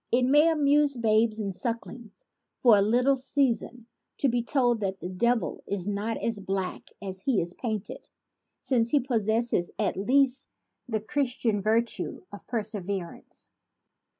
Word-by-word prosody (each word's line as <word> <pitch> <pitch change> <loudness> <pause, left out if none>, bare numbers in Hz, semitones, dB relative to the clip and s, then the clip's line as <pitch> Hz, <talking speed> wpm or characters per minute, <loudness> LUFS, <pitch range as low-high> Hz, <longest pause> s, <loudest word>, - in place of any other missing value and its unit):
It 250 +1 +3
may 295 +5 +5
amuse 295 -3 +3
babes 220 -1 +2
and 200 -3 -3
sucklings 230 0 -6 0.3
for 235 -4 +6
a 200 - +4
little 245 +6 +3
season 255 -3 -1 0.3
to 275 - +2
be 240 0 +1
told 245 -1 +1
that 195 -2 -2
the 180 - -5
devil 235 +5 0
is 195 -3 -3
not 205 +2 -2
as 225 -3 -2
black 195 -1 -4
as 190 -1 -6
he 245 -2 +1
is 170 +1 -2
painted, 220 - -5 0.5
since 235 -3 +1
he 290 - +4
possesses 225 -6 0
at 205 -3 0
least 260 +6 +2 0.4
the 220 -2 -1
Christian 240 -4 -1
virtue 225 - -1
of 205 - -11
per 230 -3 -1
severance. 195 -4 -7
230 Hz, 150 wpm, -27 LUFS, 205-255 Hz, 0.5 s, for